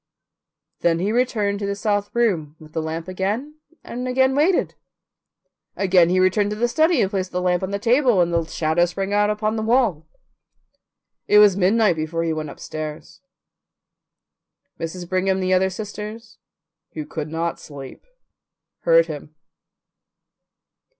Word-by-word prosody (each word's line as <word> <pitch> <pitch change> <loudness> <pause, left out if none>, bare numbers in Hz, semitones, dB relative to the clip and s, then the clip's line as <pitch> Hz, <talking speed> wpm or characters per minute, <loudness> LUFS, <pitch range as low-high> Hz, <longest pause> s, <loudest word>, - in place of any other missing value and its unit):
Then 170 -1 +2
he 190 +5 -1
returned 215 -4 0
to 200 - -3
the 200 - -2
south 205 0 -1
room 175 -11 0
with 155 -1 -15
the 160 - -1
lamp 160 +2 -4
and 250 - -5
again 260 +1 +2
waited. 330 +6 +2 1.0
Again 185 -3 +4
he 185 +1 +2
returned 185 +3 +2
to 210 - -3
the 235 +3 +1
study 315 +3 +2
and 190 - -1
placed 190 -2 -2
the 180 - -2
lamp 180 -1 +1
on 190 - -3
the 200 - -2
table, 240 0 +3
and 175 -1 +2
the 170 0 +2
shadow 160 +1 +1
sprang 195 +3 -3
out 205 0 +3
upon 215 +1 -1
the - - -1
wall. 220 - +1 1.2
It 210 - +5
was 210 -2 +7
midnight 200 -1 +3
before 160 +2 -2
he 165 -1 0
went 155 -1 -4
upstairs. 155 +4 -8 1.6
Mrs. 170 +2 -5
Brigham 190 +1 +1
and 190 - -2
the 185 0 +1
other 190 +1 +3
sisters, 215 +3 -8 0.5
who 155 -2 -5
could 155 0 -5
not 165 +1 -2
sleep, 140 -3 -10 0.8
heard 165 0 +4
him. 155 -1 -8
190 Hz, 150 wpm, -22 LUFS, 165-215 Hz, 1.6 s, was